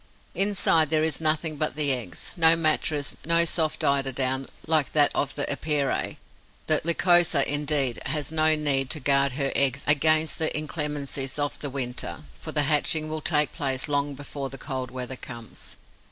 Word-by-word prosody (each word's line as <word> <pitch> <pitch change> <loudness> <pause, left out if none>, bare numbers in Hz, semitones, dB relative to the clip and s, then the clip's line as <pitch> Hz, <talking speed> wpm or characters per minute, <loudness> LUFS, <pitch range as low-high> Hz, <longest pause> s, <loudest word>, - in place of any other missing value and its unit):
Inside, 190 -6 +2
there 155 0 +2
is 160 -1 -1
nothing 155 0 0
but 155 +1 -2
the 145 -2 +3
eggs: 115 -9 -4
no 165 -1 +5
mattress, 155 -2 0
no 170 +1 +3
soft 160 -2 0
eiderdown, 135 -1 0 0.2
like 155 -4 +1
that 145 -2 +4
of 140 - -2
the 145 - -1
Epeirae. 145 -1 -1 0.5
The 155 -1 +1
Lycosa, 170 -2 +3
indeed, 145 -3 +1
has 150 +1 -3
no 155 0 +3
need 140 -3 +2
to 155 - 0
guard 140 -1 +2
her 140 0 0
eggs 140 0 +2
against 155 +2 +2
the 160 - +1
inclemencies 145 -3 -3
of 145 -1 -2
the 145 - -5
winter, 130 +2 -4 0.2
for 160 - -7
the 150 -1 +3
hatching 155 +1 +1
will 155 0 -4
take 150 -2 0
place 135 -1 -1
long 145 -1 -1
before 140 0 -6
the 135 - -8
cold 130 -2 -5
weather 130 +1 -6
comes. 115 -3 -8
145 Hz, 170 wpm, -25 LUFS, 135-155 Hz, 0.5 s, no